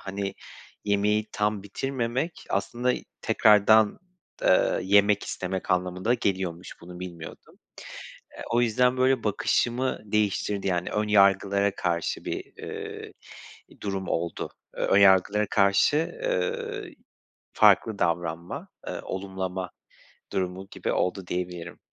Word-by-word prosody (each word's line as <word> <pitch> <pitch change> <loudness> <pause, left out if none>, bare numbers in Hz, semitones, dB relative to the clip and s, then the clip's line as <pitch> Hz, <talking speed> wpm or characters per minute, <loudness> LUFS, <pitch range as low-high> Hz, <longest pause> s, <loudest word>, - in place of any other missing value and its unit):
hani, 100 0 -4 0.5
yemeği 105 +1 +1
tam 105 -1 0
bitirmemek 130 - -3
aslında 120 +6 0 0.3
tekrardan, 105 0 +5 0.4
eee, - - +3
yemek 100 +2 +4
istemek 95 +1 -4
anlamına 90 0 0
da 120 - +3
geliyormuş, 95 -6 -2
bunu 90 +1 -11
bilmiyordum. 85 -3 -9 0.8
Eee, - - -9
o 120 - +3
yüzden, 125 +2 +2
böyle, 130 -2 +2
bakışımı 120 +4 0
değiştirdi. 105 -1 0
Yani 90 -2 0
ön 105 0 -1
yargılara 100 -1 +3
karşı 85 -1 -2
bir, - - -3
eee, - - -7 0.7
durum 95 -2 -3
oldu. 85 -1 -2 0.3
Eee, - - -1
ön - - +3
yargılara 100 +2 +5
karşı, 100 +6 +3 0.3
eee, 455 -7 -2 0.6
farklı 110 -3 +4
davranma, 85 0 -2 0.2
eee, - - -4
olumlama 95 -1 -4 0.6
durumu 95 0 -3
gibi - - -3
oldu, 90 0 -1
diyebilirim. 90 -1 -5
100 Hz, 110 wpm, -26 LUFS, 90-110 Hz, 0.8 s, tekrardan